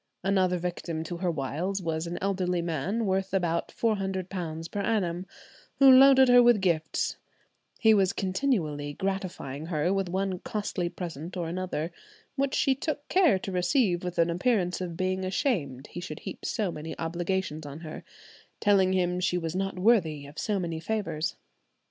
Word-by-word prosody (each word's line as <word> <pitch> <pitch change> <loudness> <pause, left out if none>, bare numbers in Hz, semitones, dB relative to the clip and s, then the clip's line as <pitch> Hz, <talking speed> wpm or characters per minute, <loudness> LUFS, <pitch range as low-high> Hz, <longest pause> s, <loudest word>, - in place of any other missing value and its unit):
Another 185 -2 +2
victim 170 -2 -3
to 170 +2 -5
her 180 0 -1
wiles 165 +6 -2
was 165 -2 -2
an 175 - -4
elderly 180 -3 0
man, 175 +8 -1
worth 190 0 0
about 170 -3 0
£400 190 -6 -2
per 205 - -3
annum, 190 -4 -1 0.5
who 270 -1 +8
loaded 265 0 +8
her 245 0 +8
with 240 -3 +5
gifts; 170 -4 0 0.6
he 220 -1 +5
was 195 -3 +3
continually 185 - -1
gratifying 180 -6 -4
her 165 +2 0
with 195 -2 -1
one 190 0 -1
costly 200 -4 -3
present 170 -1 -6
or 170 -2 -2
another, 175 -2 -3 0.4
which 275 -1 0
she 270 - +3
took 290 +2 -4
care 355 - +4
to 195 - -6
receive 180 0 +2
with 180 -1 -4
an 170 0 +3
appearance 180 -1 +1
of 170 -2 -4
being 185 0 -1
ashamed 180 - -1
he - - -6
should 155 -4 -7
heap - - -7
so 205 -5 -1
many 160 0 -7
obligations 170 -1 -2
on 145 +3 -8
her, 155 -2 -8 0.6
telling 195 -3 +4
him 180 -1 +1
she 180 0 +1
was 165 -1 -3
not 195 0 -2
worthy 180 -8 +2
of 145 +2 -9
so 210 -2 0
many 165 -3 -3
favours. 165 -4 -2
180 Hz, 165 wpm, -28 LUFS, 165-195 Hz, 0.6 s, who